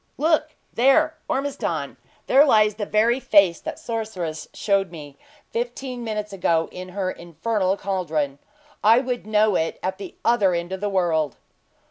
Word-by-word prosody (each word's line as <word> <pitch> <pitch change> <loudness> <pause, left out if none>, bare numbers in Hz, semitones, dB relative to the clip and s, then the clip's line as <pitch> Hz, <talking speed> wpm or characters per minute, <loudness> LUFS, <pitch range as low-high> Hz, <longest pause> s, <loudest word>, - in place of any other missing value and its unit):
"Look 310 0 +1 0.2
there, 305 +6 +4
Ormiston! 275 +1 -2 0.3
There 275 +2 +6
lies 215 -7 +4
the 205 0 -5
very 230 +4 +2
face 200 -9 +4
that - - -5
sorceress 190 -9 -4
showed 195 -2 0
me, 150 -4 -10 0.4
fifteen 245 +1 -4
minutes 210 -2 -4
ago, 170 -4 +1
in 185 0 -8
her 185 0 -2
infernal 185 +4 -2
caldron! 160 -8 -2 0.4
I 220 +3 +7
would 250 -3 -2
know 215 -1 +3
it 160 -1 -1
at 190 +1 -2
the 195 -3 -8
other 210 -6 +3
end 170 +1 -3
of 190 0 -4
the 205 - 0
world!" 165 -7 0
200 Hz, 150 wpm, -23 LUFS, 180-235 Hz, 0.4 s, I